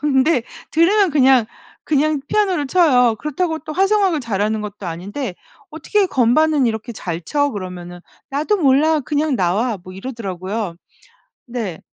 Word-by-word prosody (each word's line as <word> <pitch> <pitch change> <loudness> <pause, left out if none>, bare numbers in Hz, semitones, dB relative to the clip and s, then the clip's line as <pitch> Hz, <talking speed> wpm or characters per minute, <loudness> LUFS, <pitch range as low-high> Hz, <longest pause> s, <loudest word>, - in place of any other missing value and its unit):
근데 270 -1 +2 0.3
들으면 375 +4 +3
그냥 265 -5 +4 0.4
그냥 300 0 +1
피아노를 375 -9 +1
쳐요. 255 -9 +4
그렇다고 320 +6 -2
또 310 +1 -7
화성학을 385 -2 +2
잘하는 215 -2 -1
것도 205 -2 -7
아닌데 185 - -5 0.4
"어떻게 380 +6 0
건반은 290 +1 +3
이렇게 225 +1 -3
잘 175 -6 -5
쳐?" 285 - 0
그러면은 180 -4 -7 0.3
"나도 300 +9 0
몰라. 305 -1 +3
그냥 295 +2 -1
나와." 205 +5 0
뭐 185 - -11
이러더라고요. 195 -3 -5 0.7
네. 230 -9 -5
265 Hz, 315 characters per minute, -19 LUFS, 210-310 Hz, 0.7 s, 그냥